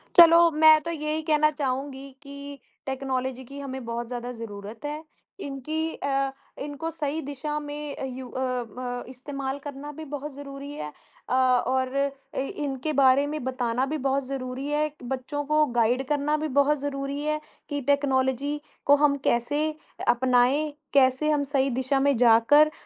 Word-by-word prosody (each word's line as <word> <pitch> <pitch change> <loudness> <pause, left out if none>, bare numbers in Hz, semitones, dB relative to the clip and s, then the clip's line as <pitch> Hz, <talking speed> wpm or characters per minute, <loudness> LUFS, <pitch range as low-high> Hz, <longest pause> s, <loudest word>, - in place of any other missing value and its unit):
चलो 335 -1 +9
मैं 310 0 +7
तो 335 - -3
ये 305 -1 -2
ही 315 - -1
कहना 305 -1 +4
चाहूँगी 275 -1 -3
कि 280 0 -9 0.3
टेक्नोलॉज़ी 260 -1 -2
की 275 +3 -9
हमें 265 -2 -5
बहुत 235 0 -3
ज़्यादा 245 0 -5
ज़रूरत 210 +1 -8
है। 300 +2 -4 0.4
इनकी 310 +4 -3
अ, 275 -1 0 0.3
इनको 295 +3 -4
सही 310 -1 -2
दिशा 290 +2 -4
में 290 -2 -5
यू 260 -1 -7
अ, 255 - -5 0.4
म 245 -1 -4
इस्तेमाल 270 +1 -5
करना 285 +1 -7
भी 315 - -6
बहुत 290 0 -6
ज़रूरी 280 0 -8
है। 150 - -6 0.4
अ, - - 0
और 255 0 +2 0.4
ए 265 - 0 0.2
इनके 275 +2 -2
बारे 275 0 +5
में 305 -2 -4
बताना 255 -1 0
भी - - 0
बहुत 270 0 +1
ज़रूरी 260 0 -4
है, 300 +1 0
बच्चों 265 +3 -3
को 305 +1 +3
गाइड 240 +3 +3
करना 295 +1 +1
भी - - 0
बहुत 290 +1 +3
ज़रूरी 280 0 -3
है 305 0 0 0.3
कि 285 -1 -2
टेक्नोलॉज़ी 280 0 +1 0.3
को 285 - +7
हम 285 -1 +3
कैसे 290 +6 +1 0.4
अपनाएँ, 255 +4 +3 0.2
कैसे 265 +2 +4
हम 290 -1 +2
सही 270 0 +3
दिशा 265 +1 +1
में 280 0 +3
जाकर 245 +6 +6
275 Hz, 160 wpm, -26 LUFS, 260-295 Hz, 0.4 s, चलो